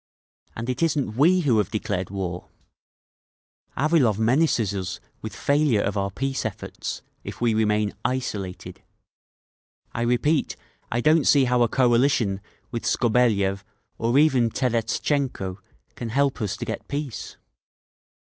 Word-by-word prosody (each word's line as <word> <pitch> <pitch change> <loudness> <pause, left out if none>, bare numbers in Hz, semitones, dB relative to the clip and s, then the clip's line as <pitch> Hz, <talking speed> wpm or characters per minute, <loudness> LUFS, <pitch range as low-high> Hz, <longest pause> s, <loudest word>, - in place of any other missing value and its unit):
And 115 +1 -5
it 125 +2 -2
isn't 145 -9 0
we 175 +8 +4
who 125 -9 +3
have 105 - 0
declared 100 -4 -2
war…. 90 -2 -4 1.3
"Avilov 140 -8 +3
menaces 115 -2 +2
us 90 -2 -4 0.2
with - - -6
failure 140 -7 +2
of 100 - -2
our 100 -1 0
peace 135 +7 -2
efforts—if 110 -3 -7
we 120 -2 +2
remain 105 -1 +1
'isolated.' 105 -7 -4 1.1
I 115 - -3
repeat, 125 +6 +1 0.4
I 120 - 0
don't 155 +2 +4
see 140 -2 +5
how 125 0 +2
a 120 - +5
coalition 120 -5 +2 0.3
with 115 -2 -4
Skobeliev, 105 -5 +2 0.4
or 120 +3 +2
even 135 -6 +4
Terestchenko, 120 -4 -1 0.3
can 120 - -6
help 135 +2 +1
us 105 0 -2
to - - -5
get - - -5
peace! 140 -4 -5
120 Hz, 125 wpm, -24 LUFS, 105-135 Hz, 1.3 s, see